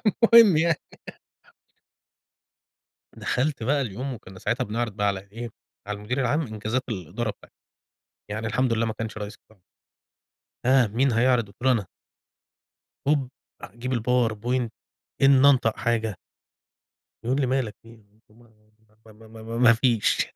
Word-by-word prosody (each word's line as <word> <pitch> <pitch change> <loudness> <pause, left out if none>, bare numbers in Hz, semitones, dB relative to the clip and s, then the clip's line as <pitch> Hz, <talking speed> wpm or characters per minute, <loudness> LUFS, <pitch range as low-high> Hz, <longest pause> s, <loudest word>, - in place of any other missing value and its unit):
المهم 225 -3 +6
يعني. 165 0 +2 2.3
دخلت 135 -1 -2
بقى 140 +5 +1
اليوم 130 +3 -4
وكنا 95 -4 -12
ساعتها 125 +6 -1
بنِعرِض 115 +1 -2
بقى 105 0 -1
على 100 -1 0
إيه، 120 +1 -6 0.4
على 105 0 -3
المدير 125 +6 -3
العام 145 +6 +1
إنجازات 110 +4 -2
الإدارة 105 +2 -3
بتاعتنا، 100 - -17 0.7
يعني 110 +2 -3
الحمد 125 +2 +1
لله 115 0 +1
ما 110 - -2
كانش 110 0 -6
رئيس 105 0 -6
قطاع. 110 -3 -27 1.1
ها، 130 -2 +5
مين 120 +5 +1
هيعرض؟ 120 -1 +3
قُلت 100 - -19
له: 130 - +4
"أنا." 110 -6 -1 1.2
هوب 140 -4 +1 0.3
أجيب 125 +3 -6
الpowerpoint 120 0 0 0.5
إني 135 0 +7
أنطق 120 -5 +2
حاجة 110 -4 -1 1.1
يقول 130 +4 0
لي: 130 - +1
"مالك 130 -4 -1
في 115 - -17
إيه؟"، 115 -2 -17 0.3
ما 120 +1 -21 0.6
ما 110 +1 -17
ما 110 0 -12
ما 115 +1 -5
ما 120 -1 +7
فيش. 115 -2 +2
120 Hz, 140 wpm, -25 LUFS, 110-130 Hz, 2.3 s, إني